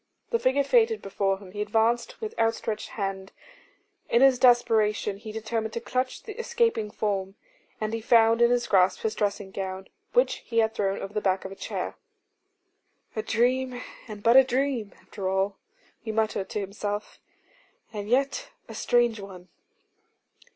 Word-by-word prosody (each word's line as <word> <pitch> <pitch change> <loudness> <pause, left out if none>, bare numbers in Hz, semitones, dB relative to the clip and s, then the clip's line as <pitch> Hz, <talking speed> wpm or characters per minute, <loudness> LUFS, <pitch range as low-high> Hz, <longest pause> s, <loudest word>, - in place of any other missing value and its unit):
The 465 - +2
figure 275 -2 +2
faded 450 - +3
before 195 0 -1
him; 190 -2 -13
he 205 +1 -5
advanced 225 +3 +1
with 440 -1 -5
outstretched 225 -1 -1
hand; 195 -1 -3 0.8
in 235 +3 +4
his 265 -2 +5
desperation 225 -5 +3
he 215 +1 -8
determined 220 0 -3
to - - -2
clutch 255 +2 -2
the 435 +1 -8
escaping 465 - +1
form: 195 -2 -2 0.4
and 215 0 -2
he 225 - -2
found 230 0 +4
in 235 - +6
his 245 0 +2
grasp 185 -1 +3
his 220 - -1
dressing 200 -2 -2
gown, 190 0 -5 0.2
which - - +3
he 230 - -6
had 220 -1 +3
thrown 195 -2 0
over 195 - -7
the 210 - -1
back 190 -1 0
of 190 - -6
a - - -8
chair. - - -4 1.2
'A 215 - 0
dream, 245 +3 +1 0.3
and 210 -2 -9
but 235 +2 +5
a 265 - +10
dream, 255 -4 -1
after 195 -3 -5
all,' 195 +1 0 0.4
he 220 - -5
muttered 215 -3 -1
to - - -2
himself; 205 +1 -4 0.7
'and 205 -1 -5
yet 275 - +1 0.2
a - - -9
strange 240 -2 +2
one. 185 -2 -10
220 Hz, 165 wpm, -27 LUFS, 200-245 Hz, 1.2 s, a